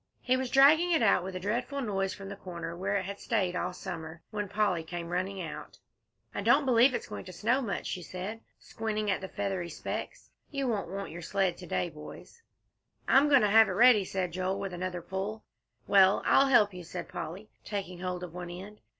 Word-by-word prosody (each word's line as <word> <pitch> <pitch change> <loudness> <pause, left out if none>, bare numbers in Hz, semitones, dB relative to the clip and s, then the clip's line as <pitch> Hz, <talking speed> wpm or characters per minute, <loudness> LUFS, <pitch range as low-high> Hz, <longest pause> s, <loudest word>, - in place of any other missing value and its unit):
He 255 - +3
was 260 -1 -2
dragging 305 +7 +6
it 320 -8 +3
out 195 -4 +4
with 190 0 -6
a - - -3
dreadful 240 +8 -2
noise 195 -6 -1
from 195 -1 -8
the 200 - -6
corner 170 -3 -7
where 195 +3 -1
it 200 - +1
had 200 +1 -6
stayed 190 -6 0
all 180 0 -1
summer, 160 -2 -7
when 210 -2 -3
Polly 205 -5 +1
came 170 +1 -6
running 185 +2 -2
out. 165 -4 -7 0.6
"I - - -3
don't 295 - +4
believe 250 0 +5
it's - - -3
going - - -7
to 185 - -8
snow 230 +9 +1
much," 225 -6 -3
she 180 - -3
said, 185 +6 -6 0.2
squinting 215 -2 -3
at 190 - -1
the 190 - -5
feathery 190 -3 -3
specks. - - -6 0.2
"You 275 -2 -2
won't 215 -7 -1
want 195 -1 -5
your 170 +2 -7
sled 185 +1 0
to 180 - -10
day, 175 - -1
boys." 155 - -12 0.7
"I'm 280 +2 +5
goin' 280 -3 +6
to 210 - +3
have 220 +1 +7
it - - -2
ready," 240 -4 +6
said 185 -2 -2
Joel, 185 +2 -1
with 195 -2 -4
another 180 -1 -4
pull. 200 +4 -4 0.4
"Well, 195 -1 +5
I'll 275 - +5
help 215 -6 +5
you," 180 -1 -8
said 170 - -6
Polly, 180 +4 -7
taking 190 -4 -5
hold 180 0 -3
of 175 -2 -7
one 175 0 -6
end. 195 +4 -9
195 Hz, 215 wpm, -30 LUFS, 180-220 Hz, 0.7 s, have